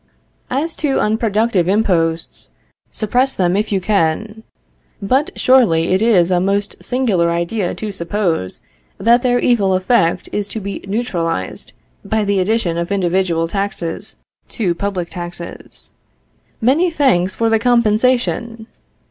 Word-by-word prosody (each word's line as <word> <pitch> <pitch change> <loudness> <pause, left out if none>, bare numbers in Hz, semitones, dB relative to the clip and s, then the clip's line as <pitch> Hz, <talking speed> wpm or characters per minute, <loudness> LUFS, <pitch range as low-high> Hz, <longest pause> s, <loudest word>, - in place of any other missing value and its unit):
As 300 +6 -1
to 290 -3 +1
unproductive 215 -3 +1
imposts, 170 -5 0 0.4
suppress 250 +5 +1
them 180 -1 +1
if 210 +2 -1
you 195 - +1
can; 205 +3 -1 0.6
but 260 +9 +1
surely 220 -11 +3
it 190 - +2
is 190 -6 +3
a 180 - +3
most 200 +2 -1
singular 220 -10 +1
idea 170 +3 -1
to 215 -1 -5
suppose, 170 - -2 0.4
that 235 +5 +4
their 245 -1 +2
evil 205 -7 +2
effect 185 -2 +1
is 205 -1 -2
to 220 - -5
be 200 -1 -6
neutralized 175 - -2 0.3
by 220 -1 -1
the 200 -1 +1
addition 185 -4 0
of 170 +2 -3
individual 180 -3 +1
taxes 195 -3 -4 0.3
to 190 -7 -1
public 185 -2 -3
taxes. 175 -1 -8 0.7
Many 285 +10 +3
thanks 240 - +1
for 230 -1 +1
the 225 - +3
compensation! 235 0 +1
200 Hz, 130 wpm, -17 LUFS, 175-230 Hz, 0.7 s, that